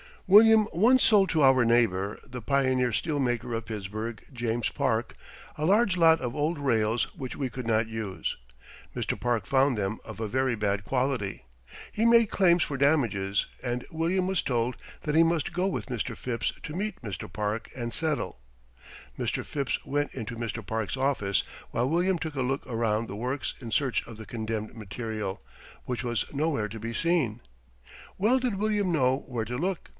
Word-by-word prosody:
William 215 Hz, +2 st, +7 dB
once 240 Hz, +9 st, +5 dB
sold 200 Hz, -3 st, +5 dB
to 155 Hz, -2 st, +3 dB
our 130 Hz, -2 st, +6 dB
neighbor, 110 Hz, -4 st, +2 dB
the 125 Hz, 0 st, -7 dB
pioneer 130 Hz, -1 st, +2 dB
steel 150 Hz, +4 st, 0 dB
maker 120 Hz, -2 st, -1 dB
of 115 Hz, 0 st, -3 dB
Pittsburgh, 110 Hz, +1 st, -5 dB
James 120 Hz, -2 st, -1 dB
Park, -, -, -1 dB, 0.4 s
a 150 Hz, -, -1 dB
large 200 Hz, +1 st, +3 dB
lot 165 Hz, -1 st, +5 dB
of 120 Hz, -2 st, -3 dB
old 155 Hz, +3 st, 0 dB
rails 115 Hz, -5 st, +1 dB
which 130 Hz, -2 st, -6 dB
we 135 Hz, -3 st, -2 dB
could 125 Hz, -1 st, -6 dB
not 110 Hz, 0 st, +2 dB
use. 110 Hz, -4 st, -4 dB, 0.6 s
Mr. -, -, -2 dB
Park 120 Hz, -2 st, 0 dB
found 135 Hz, -2 st, +3 dB
them 100 Hz, +1 st, -2 dB
of 110 Hz, 0 st, -9 dB
a 110 Hz, -, -2 dB
very 130 Hz, +1 st, +1 dB
bad 100 Hz, -1 st, -1 dB
quality. 125 Hz, -, -1 dB, 0.5 s
He 220 Hz, -, 0 dB
made 230 Hz, -2 st, +5 dB
claims 175 Hz, -3 st, +4 dB
for 140 Hz, -, -3 dB
damages 115 Hz, -9 st, +2 dB, 0.2 s
and 120 Hz, -1 st, -3 dB
William 170 Hz, +4 st, 0 dB
was 190 Hz, -1 st, +1 dB
told 120 Hz, -1 st, -1 dB, 0.2 s
that 150 Hz, 0 st, -1 dB
he 160 Hz, -, +7 dB
must 165 Hz, +1 st, +2 dB
go 180 Hz, +2 st, +1 dB
with 195 Hz, -, -3 dB
Mr. 125 Hz, -5 st, -3 dB
Phipps 120 Hz, -2 st, -2 dB
to 150 Hz, -, -6 dB
meet 205 Hz, +1 st, -3 dB
Mr. 105 Hz, -6 st, -6 dB
Park 105 Hz, +1 st, -2 dB
and 120 Hz, -2 st, -4 dB
settle. 155 Hz, -, -2 dB, 0.8 s
Mr. -, -, -1 dB
Phipps 140 Hz, -3 st, -2 dB
went 145 Hz, +1 st, -1 dB
into 115 Hz, -2 st, -5 dB
Mr. 115 Hz, -1 st, -4 dB
Park's 110 Hz, 0 st, -2 dB
office, 125 Hz, -9 st, +1 dB, 0.3 s
while 125 Hz, +3 st, 0 dB
William 175 Hz, +3 st, +2 dB
took 160 Hz, -2 st, -5 dB
a 135 Hz, -, -1 dB
look 135 Hz, +2 st, -1 dB
around 115 Hz, -2 st, 0 dB
the 100 Hz, -, -6 dB
works 130 Hz, +5 st, -2 dB
in 120 Hz, -4 st, -7 dB
search 130 Hz, +1 st, 0 dB
of 115 Hz, -, -9 dB
the 110 Hz, 0 st, -9 dB
condemned 110 Hz, 0 st, -4 dB
material, 105 Hz, -1 st, -4 dB, 0.4 s
which 125 Hz, -1 st, -3 dB
was 120 Hz, -4 st, 0 dB
nowhere 140 Hz, -7 st, 0 dB
to 110 Hz, +2 st, -7 dB
be 115 Hz, +2 st, -4 dB
seen. 130 Hz, -6 st, +1 dB, 0.8 s
Well 225 Hz, +7 st, +3 dB
did 250 Hz, -5 st, -1 dB
William 205 Hz, -2 st, +1 dB
know 130 Hz, -3 st, +2 dB
where 120 Hz, -4 st, -2 dB
to 120 Hz, +2 st, -4 dB
look. 180 Hz, +4 st, -2 dB
125 Hz, 180 wpm, -28 LUFS, 110-160 Hz, 0.8 s, William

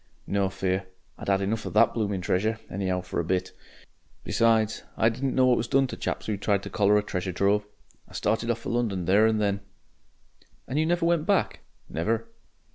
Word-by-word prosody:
"No 100 Hz, -1 st, 0 dB
fear. 95 Hz, 0 st, -2 dB, 0.3 s
I'd -, -, -5 dB
'ad 95 Hz, 0 st, +3 dB
enough 110 Hz, +3 st, -1 dB
of -, -, -6 dB
THAT 115 Hz, +2 st, +5 dB
blooming 100 Hz, -4 st, -1 dB
treasure, 105 Hz, +5 st, 0 dB
any'ow 95 Hz, -1 st, -1 dB
for -, -, -4 dB
a -, -, +1 dB
bit. 90 Hz, +2 st, -1 dB, 0.7 s
Besides, 110 Hz, -1 st, +2 dB, 0.2 s
I 110 Hz, -, +4 dB
didn't 130 Hz, +3 st, -2 dB
know 130 Hz, -, +5 dB
what 125 Hz, -1 st, +4 dB
was 115 Hz, -, -1 dB
done 135 Hz, +2 st, +3 dB
to 130 Hz, -, -5 dB
chaps -, -, -3 dB
who 105 Hz, -2 st, -2 dB
tried 100 Hz, 0 st, 0 dB
to -, -, -7 dB
collar 105 Hz, 0 st, +3 dB
a 105 Hz, -, +1 dB
treasure 90 Hz, -2 st, -3 dB
trove. 100 Hz, +3 st, +1 dB, 0.4 s
I -, -, -18 dB
started 115 Hz, +1 st, 0 dB
off 115 Hz, -1 st, 0 dB
for -, -, -4 dB
London 110 Hz, -7 st, -1 dB
there 100 Hz, +5 st, +5 dB
and 110 Hz, -1 st, +1 dB
then...." 100 Hz, -1 st, +1 dB, 1.1 s
"And 135 Hz, +4 st, -1 dB
you 160 Hz, -, +2 dB
never 175 Hz, 0 st, +1 dB
went 170 Hz, -2 st, +1 dB
back?" -, -, +1 dB, 0.3 s
"Never." 110 Hz, +8 st, -1 dB
105 Hz, 200 wpm, -26 LUFS, 95-115 Hz, 1.1 s, THAT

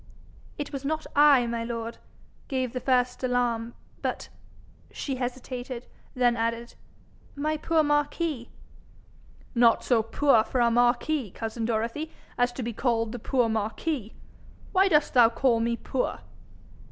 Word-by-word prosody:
'It 290 Hz, -1 st, -5 dB
was 275 Hz, -1 st, -4 dB
not 310 Hz, +2 st, -2 dB
I, 285 Hz, -4 st, +6 dB
my 235 Hz, 0 st, -2 dB
lord, 230 Hz, 0 st, -5 dB, 0.5 s
gave 260 Hz, -3 st, -2 dB
the 255 Hz, -, -2 dB
first 250 Hz, 0 st, +1 dB
alarm, 240 Hz, -2 st, 0 dB, 0.3 s
but -, -, -3 dB, 0.3 s
' -, -, -28 dB
She 270 Hz, -3 st, -2 dB
hesitated, 250 Hz, 0 st, -5 dB, 0.3 s
then 245 Hz, -1 st, +3 dB
added, 230 Hz, +1 st, -2 dB, 0.6 s
'my 305 Hz, +2 st, -1 dB
poor 320 Hz, +1 st, +2 dB
Marquis.' 295 Hz, -2 st, 0 dB, 1.0 s
'Not 235 Hz, -2 st, +4 dB
so 240 Hz, -3 st, +3 dB
poor 225 Hz, +1 st, +3 dB
for 255 Hz, -, -2 dB
a 235 Hz, -1 st, +4 dB
marquis, 245 Hz, +2 st, +2 dB
cousin 225 Hz, +3 st, -4 dB
Dorothy, 235 Hz, +8 st, -2 dB, 0.2 s
as 245 Hz, 0 st, +2 dB
to 255 Hz, -, -5 dB
be 235 Hz, +1 st, -3 dB
called 230 Hz, -1 st, 0 dB
the 245 Hz, -, -5 dB
poor 245 Hz, +1 st, +1 dB
Marquis. 220 Hz, +3 st, -2 dB, 0.6 s
Why 380 Hz, 0 st, +4 dB
dost 300 Hz, -5 st, +3 dB
thou 240 Hz, -3 st, +7 dB
call 235 Hz, 0 st, +2 dB
me 235 Hz, +1 st, 0 dB
poor?' 250 Hz, -, -2 dB
245 Hz, 140 wpm, -27 LUFS, 230-275 Hz, 1.0 s, thou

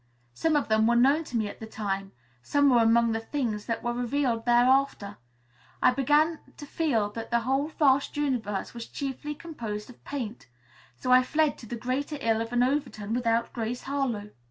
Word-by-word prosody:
Some 320 Hz, -, +1 dB
of 295 Hz, -, +1 dB
them 220 Hz, 0 st, +3 dB
were 235 Hz, -, +3 dB
known 275 Hz, +7 st, +4 dB
to 245 Hz, -, -3 dB
me 215 Hz, -2 st, 0 dB
at -, -, -9 dB
the 220 Hz, -, -7 dB
time; 195 Hz, -3 st, -3 dB, 0.3 s
some 285 Hz, -, +3 dB
were 240 Hz, -2 st, +5 dB
among 230 Hz, +1 st, +4 dB
the 225 Hz, -, -1 dB
things 225 Hz, -4 st, -3 dB
that 230 Hz, -, -2 dB
were 240 Hz, -, -1 dB
revealed 245 Hz, -1 st, -1 dB
thereafter. 245 Hz, -4 st, +3 dB, 0.6 s
I -, -, +5 dB
began 295 Hz, +5 st, +2 dB, 0.2 s
to 290 Hz, -, -8 dB
feel 245 Hz, -10 st, 0 dB
that 225 Hz, +1 st, -6 dB
the 235 Hz, 0 st, +2 dB
whole 270 Hz, +4 st, 0 dB
vast 280 Hz, -2 st, +2 dB
universe 235 Hz, -9 st, -2 dB
was 235 Hz, -1 st, -7 dB
chiefly 285 Hz, +1 st, -5 dB
composed 235 Hz, -10 st, -6 dB
of 240 Hz, -, -20 dB
paint. 240 Hz, -, -6 dB, 0.5 s
So 250 Hz, -, -2 dB
I 255 Hz, 0 st, +8 dB
fled 300 Hz, +3 st, +1 dB
to 230 Hz, -, -11 dB
the 240 Hz, -, -4 dB
greater 260 Hz, +6 st, -3 dB
ill 225 Hz, -4 st, +1 dB
of 230 Hz, +1 st, -4 dB
an 245 Hz, 0 st, +3 dB
Overton 250 Hz, -6 st, -1 dB
without 230 Hz, -1 st, 0 dB
Grace 235 Hz, +1 st, -3 dB
Harlowe. 250 Hz, -7 st, -2 dB
245 Hz, 190 wpm, -27 LUFS, 225-280 Hz, 0.6 s, I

